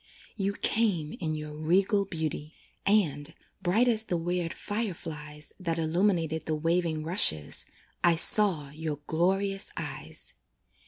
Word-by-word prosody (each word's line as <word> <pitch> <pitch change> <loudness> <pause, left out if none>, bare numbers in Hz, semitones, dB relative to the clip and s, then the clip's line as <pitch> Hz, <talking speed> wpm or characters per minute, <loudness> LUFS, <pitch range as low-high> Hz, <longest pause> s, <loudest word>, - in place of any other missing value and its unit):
You 200 -2 -1
came 200 -9 +1
in 155 -3 -2
your 150 -1 -6
regal 190 +6 +2
beauty, 160 -3 -4 0.3
And, 165 -7 +1 0.3
bright 215 +8 +2
as 220 -2 +5
the 175 - -1
weird 175 0 -2
fire 210 -1 -3
flies 150 -1 -9
That 170 -3 -2
illumined 170 +2 +1
the 160 0 -2
waving 165 0 0
rushes, 80 - +2 0.4
I 175 -1 +5
saw 165 -5 +5
your 155 0 -4
glorious 195 +5 0
eyes. 150 -5 -6
165 Hz, 125 wpm, -28 LUFS, 155-195 Hz, 0.4 s, as